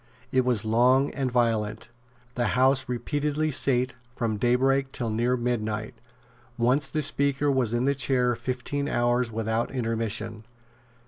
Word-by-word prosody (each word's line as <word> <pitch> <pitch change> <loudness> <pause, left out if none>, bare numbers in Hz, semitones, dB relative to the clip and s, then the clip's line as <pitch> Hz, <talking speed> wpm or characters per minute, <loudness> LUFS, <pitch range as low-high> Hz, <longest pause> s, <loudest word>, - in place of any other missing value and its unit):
It 130 -1 +3
was 120 -4 +1
long 125 +5 +3
and 135 -3 -2
violent. 115 -2 0 0.4
The 120 -2 0
House 130 0 +3
repeatedly 145 +5 -1
sate 130 -2 +1 0.2
from 110 -3 -1
daybreak 135 +4 +2
till 115 -4 -3
near 120 +3 +1
midnight. 110 -3 -2 0.6
Once 125 +5 +2
the 155 -1 -1
Speaker 140 0 +1
was 130 -5 +1
in 120 +2 0
the 140 - +3
chair 125 -2 +1
fifteen 135 +4 -3
hours 120 -1 +1
without 110 +1 -1
intermission. 115 -3 -2
125 Hz, 135 wpm, -26 LUFS, 115-135 Hz, 0.6 s, It